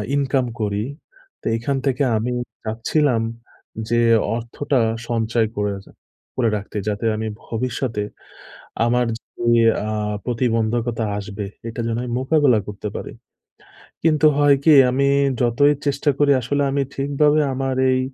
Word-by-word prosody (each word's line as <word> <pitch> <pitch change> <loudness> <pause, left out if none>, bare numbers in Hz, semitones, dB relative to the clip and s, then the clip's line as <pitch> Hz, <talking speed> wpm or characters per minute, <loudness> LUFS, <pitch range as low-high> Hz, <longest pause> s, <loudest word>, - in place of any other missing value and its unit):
Income 135 -2 +1
করি 105 -1 -1 0.6
তে - - -5
এখান 135 +4 -1
থেকে 135 +1 +1
আমি 120 +3 -2 0.3
চাচ্ছিলাম 115 +3 +1 0.7
যে 120 - +2 0.4
অর্থটা 125 +3 -1 0.3
সঞ্চয় 115 -1 +1
করে 105 0 0
রা - - -17 0.4
করে 120 -3 +2
রাখতে। 105 +1 -7
যাতে 105 +2 -2
আমি 110 +1 -3 0.2
ভবিষ্যতে 115 -2 -2 0.8
আমার 125 0 +2
যে 120 0 0 0.3
আ - - -2 0.3
প্রতিবন্ধকতা 115 -1 0
আসবে 100 0 -5 0.2
এটা 115 - -5
যেন 115 0 -1
আমি 125 - -5
মোকাবেলা 135 -3 +3
করতে 105 0 -6
পারি। - - -6 0.9
কিন্তু 155 -1 +3
হয় 145 -1 +5
কি 160 - +7 0.2
আমি 140 +2 +2 0.3
যতই 125 +5 +4
চেষ্টা 140 +1 +1
করি 145 -1 +4
আসলে 145 +4 -1
আমি 140 0 +1
ঠিকভাবে 145 +2 +2
আমার 135 0 -1 0.2
এই 130 - +2
120 Hz, 130 wpm, -21 LUFS, 115-140 Hz, 0.9 s, কি